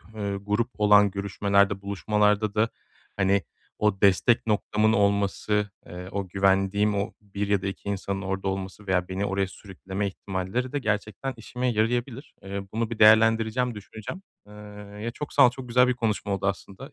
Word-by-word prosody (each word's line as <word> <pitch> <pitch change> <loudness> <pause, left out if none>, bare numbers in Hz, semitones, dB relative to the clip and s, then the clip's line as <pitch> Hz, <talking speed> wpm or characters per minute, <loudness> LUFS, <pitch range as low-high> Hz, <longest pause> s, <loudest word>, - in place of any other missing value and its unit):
eee, 100 -2 -3
grup 105 +4 -1
olan 105 -1 +5
görüşmelerde, 100 0 +1
buluşmalarda 105 +1 +1
da, 110 +2 +2 0.5
hani, 95 0 +2 0.4
o 105 -2 +1
destek 105 +5 +3
noktamın 105 0 +2
olması, 100 0 +1 0.2
eee, 90 +2 -8
o 100 -1 -3
güvendiğim 95 +2 +2
o 100 +1 -2
1 100 0 -4
ya 100 -2 +1
da 100 - -3
2 95 +1 -6
insanın 100 0 -3
orada 95 0 -3
olması 95 +1 -5
veya 90 -1 +1
beni 95 +2 -2
oraya 95 -1 0
sürükleme 95 +1 -5
ihtimalleri 95 +6 -3
de 145 - 0
gerçekten 110 +2 -2
işime 125 +3 -4
yarayabilir. 120 +4 -1
Eee, 100 0 -5
bunu 115 0 -1
bir 115 - -6
değerlendireceğim, 115 +2 +4
düşüneceğim, 110 - -8 0.3
ııı, 105 0 -11
ya, 115 +2 -3
çok 150 - -7
sağ 140 - +7
ol, - - 0
çok 125 0 -9
güzel 125 +1 +4
bir 125 - +2
konuşma 110 -4 -1
oldu 95 0 -1
aslında. 100 +7 -5
105 Hz, 165 wpm, -26 LUFS, 100-110 Hz, 0.5 s, sağ